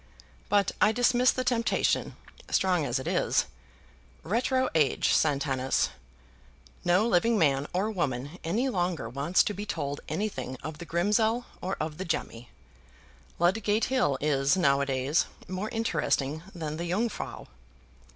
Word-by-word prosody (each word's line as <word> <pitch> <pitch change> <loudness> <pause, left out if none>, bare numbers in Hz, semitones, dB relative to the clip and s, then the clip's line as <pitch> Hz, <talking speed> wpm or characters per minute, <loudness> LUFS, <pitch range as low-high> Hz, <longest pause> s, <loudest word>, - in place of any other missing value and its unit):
But 200 -2 +3
I 210 - +6
dismiss 245 +2 +3
the 255 - +1
temptation, 240 -2 +1 0.3
strong 180 -5 +2
as 120 - 0
it 130 - -5
is. - - +2 0.8
Retro 255 +7 +1
age, 150 -5 +2
Satanas. 135 -3 +1 0.9
No 180 +5 +3
living 225 +3 +3
man 140 -5 +2
or 195 +5 0
woman 145 - -3
any 220 +11 0
longer 180 - -1
wants 140 +9 +2
to 210 - -2
be 205 - -5
told 145 -8 -3
anything 205 -10 -3
of 155 -1 -6
the 170 - -7
Grimsell 220 +7 +1 0.2
or 190 +2 -3
of 155 +1 -4
the 190 - -3
Gemmi. 120 -7 -3 0.9
Ludgate 205 +5 +2
Hill 240 - +2
is 140 +2 +2
now 140 -5 +3
a 140 - -1
days 135 +4 +1 0.2
more 185 +3 -3
interesting 160 -9 -1
than 155 -2 -4
the 170 +1 -4
Jungfrau. 220 +6 -2
175 Hz, 140 wpm, -28 LUFS, 145-215 Hz, 0.9 s, I